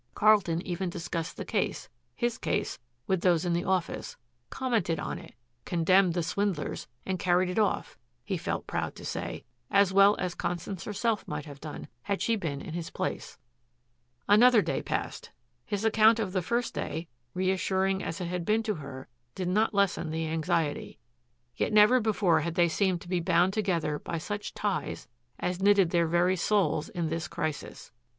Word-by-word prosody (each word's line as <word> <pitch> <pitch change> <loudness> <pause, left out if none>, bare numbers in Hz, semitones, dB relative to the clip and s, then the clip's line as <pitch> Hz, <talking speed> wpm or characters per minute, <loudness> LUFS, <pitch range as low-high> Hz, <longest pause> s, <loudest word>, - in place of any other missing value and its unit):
Carlton 200 -5 +3
even 180 +1 -2
discussed 170 -1 -4
the - - -5
case, - - -1 0.3
his 240 -1 -1
case, - - -1 0.3
with 190 -2 0
those 175 -2 +3
in 175 - +1
the 170 - 0
office, 185 -3 -2 0.3
commented 225 - 0
on - - -4
it, - - -14 0.3
condemned 180 +1 +3
the 175 - 0
swindlers, 195 -4 -2 0.2
and 190 -1 -2
carried 180 +1 +2
it 180 - 0
off, 210 -2 0 0.3
he - - -1
felt - - -3
proud - - -3
to - - -10
say, - - -4 0.3
as 200 -1 +4
well 200 +1 +7
as 180 -1 -2
Constance 175 +1 -4
herself 215 +1 -1
might 145 - -4
have 145 -2 -11
done 155 -1 -7
had 200 +8 -2
she 230 - +1
been 150 -9 -3
in 160 - -7
his 170 -1 -4
place. - - -4 0.9
Another 220 +1 +6
day 140 -5 -1
passed. - - -4 0.4
His 205 +1 -2
account 220 0 +5
of 205 -5 -2
the 185 - +1
first 235 +6 -1
day, 160 +2 -4 0.3
reassuring 190 +1 +1
as 165 - -4
it 180 - -3
had 175 0 -3
been 215 +5 +2
to 215 - 0
her, 140 -5 -8 0.3
did 185 -2 -2
not 215 +4 +2
lessen 200 -5 +1
the 160 +1 -2
anxiety. 160 -1 -1 0.6
Yet - - 0
never 215 +4 +6
before 210 -6 +2
had 170 -1 -3
they 175 -1 +4
seemed 185 0 +1
to - - -12
be 180 0 0
bound 175 +2 +3
together 170 -8 0
by 170 - -4
such 205 +6 -5
ties 205 -2 -2 0.3
as 180 +1 -2
knitted 195 -3 +5
their 170 -1 +3
very 175 +3 +2
souls 170 -5 +1
in 170 -4 -2
this 165 +1 -2
crisis. 150 -3 -5
180 Hz, 175 wpm, -29 LUFS, 170-205 Hz, 0.9 s, well